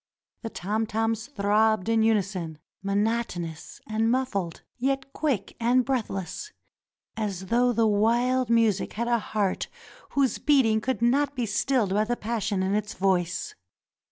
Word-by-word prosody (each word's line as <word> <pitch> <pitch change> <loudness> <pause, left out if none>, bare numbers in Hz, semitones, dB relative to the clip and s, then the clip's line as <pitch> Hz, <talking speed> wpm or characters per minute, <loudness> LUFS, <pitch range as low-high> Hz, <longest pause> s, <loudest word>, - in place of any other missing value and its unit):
The 225 - -4
tom 215 +3 -2
toms 225 +1 -1
throbbed 215 -4 +2
in 225 -1 +3
unison, 195 -7 0 0.2
monotonous 200 -5 -2
and 220 +1 0
muffled, 225 -10 -1 0.2
yet 270 +1 -1
quick 260 -11 -1
and 245 +2 +3
breathless, 250 - -3 0.6
as 200 -4 -3
though 245 +5 +3
the 230 -1 +2
wild 235 +4 +2
music 225 -4 +2
had 235 +3 -2
a 240 -1 +2
heart 205 -3 -1 0.5
whose 275 -2 +1
beating 245 -7 +3
could 255 0 -1
not 280 +4 +2
be 245 -2 -1
stilled 225 0 +1
by 210 +2 +2
the 240 +2 -1
passion 210 -3 -1
in 190 +1 0
its 210 0 -2
voice. 185 -2 0
220 Hz, 140 wpm, -26 LUFS, 200-240 Hz, 0.6 s, in